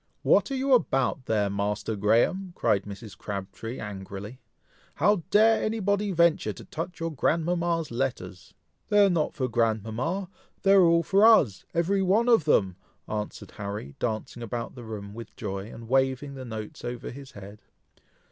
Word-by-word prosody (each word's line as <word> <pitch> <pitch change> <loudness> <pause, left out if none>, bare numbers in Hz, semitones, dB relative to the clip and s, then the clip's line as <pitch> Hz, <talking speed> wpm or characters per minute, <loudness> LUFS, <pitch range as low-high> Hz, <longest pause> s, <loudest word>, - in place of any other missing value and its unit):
"What - - +4
are 275 - -2
you 265 +1 +1
about 135 - +1
there, 105 -2 +2
Master 100 +2 -2
Graham?" 120 - +1
cried 100 -1 +1
Mrs. 100 +1 -9
Crabtree, 100 +4 -6
angrily, 100 +3 -7 0.6
"how 205 +7 +3
dare 220 +2 +5
any 220 +1 -1
body 200 0 0
venture 170 -2 +2
to - - -12
touch 165 +2 -6
your 165 0 -2
grandmama's 165 +2 0
letters?" 115 -7 -4 0.3
"They 205 0 +6
are 195 - +3
not 160 -3 0
for 130 -3 -1
grandmama! 115 - -1 0.4
they 195 - +4
are 195 - +7
all 170 -1 +4
for 195 +3 +3
us! 185 - +5
every 185 +4 +2
one 200 +6 +3
of 225 -10 +5
them!" 95 - +2 0.3
answered 105 -1 -5
Harry, 100 - -5
dancing 115 +1 -3
about 115 +1 -4
the 125 - -10
room 100 -2 -7
with 115 0 -10
joy, 100 0 -5
and 115 0 -10
waving 135 +2 +1
the 130 -1 -8
notes 110 -2 -7
over 120 0 -5
his 135 +1 -11
head. 100 +1 -11
130 Hz, 165 wpm, -27 LUFS, 105-175 Hz, 0.6 s, are